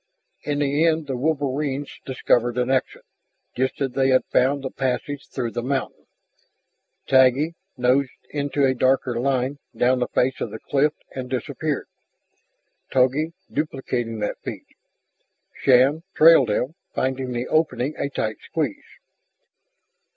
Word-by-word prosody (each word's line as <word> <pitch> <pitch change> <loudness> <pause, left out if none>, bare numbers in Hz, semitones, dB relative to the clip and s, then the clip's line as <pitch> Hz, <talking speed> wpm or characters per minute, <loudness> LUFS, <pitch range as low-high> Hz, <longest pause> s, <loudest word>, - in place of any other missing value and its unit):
In 145 -1 -2
the 145 +2 +1
end 160 -1 +2
the 135 -2 -3
wolverines 140 0 -2
discovered 120 -2 +1
an 125 +1 +1
exit, 130 -1 -1 0.5
just 130 +1 -1
as 135 -2 0
they 135 +1 +2
had 130 0 +4
found 135 +2 +3
the 130 - -4
passage 135 +1 -3
through 120 -3 -3
the 120 - -3
mountain. 135 +2 -3 1.0
Taggi 130 +4 +4 0.2
nosed 130 +2 +2 0.2
into 145 -1 0
a 130 - +3
darker 130 -1 +1
line 135 +2 0 0.2
down 125 +1 +3
the 125 - 0
face 130 +1 0
of - - -2
the 110 - -7
cliff 145 +6 +1 0.2
and 130 -1 -5
disappeared, 140 +3 -2 1.1
Togi 135 +5 +2 0.2
duplicating 125 -6 -2
that 105 - -2
feat. - - -7 0.9
Shann 135 +4 +4
trailed 155 -6 +7
them, 125 +7 0 0.2
finding 130 -1 -1
the 120 +1 -3
opening 155 -3 +1
a 140 - -2
tight 110 -5 -2
squeeze. 150 -10 -4
130 Hz, 135 wpm, -23 LUFS, 125-145 Hz, 1.1 s, trailed